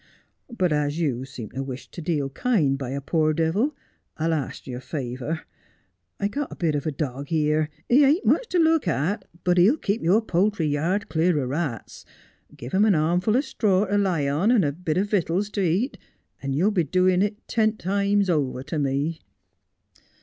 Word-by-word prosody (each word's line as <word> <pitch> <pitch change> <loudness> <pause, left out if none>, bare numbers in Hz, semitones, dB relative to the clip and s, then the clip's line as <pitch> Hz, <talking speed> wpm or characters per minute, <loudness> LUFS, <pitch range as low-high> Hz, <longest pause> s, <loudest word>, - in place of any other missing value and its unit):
But 185 -9 0
as 150 +1 0
you 130 -6 -1
seem 130 -5 -9
to 135 - -4
wish 130 -1 -7
to 175 - -8
deal 150 -4 -1
kind 165 - +1
by 135 -3 -5
a 140 +2 -3
poor 155 +2 +1
devil, 170 - 0 0.4
I'll 165 +1 0
arst 150 -4 -4
you 125 -2 -5
a - - -8
favour. 135 +3 -4 0.8
I've 200 0 -1
got 285 +4 -3
a - - -7
bit 165 -3 0
of 145 +1 -2
a - - 0
dog 140 -1 -4
here. 155 -1 +1 0.2
He 270 +4 +5
ain't 295 +8 +3
much - - +3
to 365 - -1
look 320 - +3
at, 165 +5 -1 0.2
but 180 0 +3
he'll 215 - +5
keep 215 -4 -1
your 200 +7 +3
poultry 190 -2 +1
yard 165 +7 0
clear 160 0 +1
o' 135 - -1
rats. 135 -3 -4 0.5
Give 120 - -8
him 195 +2 +3
a 215 - +5
armful 175 +8 +2
o' - - +3
straw 205 -8 +1
to 205 0 -1 0.2
he 145 -2 0
on 150 +10 +1
and 230 -8 +4
a 145 - +1
bit 160 +1 -3
o' 190 - +3
vitals 200 0 0
to 205 - -2
eat, 190 - 0 0.4
and 135 -1 -2
you'll 185 +9 +2
be 185 -5 +2
doin' 185 +3 +2
it 205 +2 -2
ten 220 -2 +1
times 200 +1 +1
over 140 -7 0
to 150 +2 -3
me.' 145 +4 -1
165 Hz, 200 wpm, -24 LUFS, 145-205 Hz, 0.8 s, He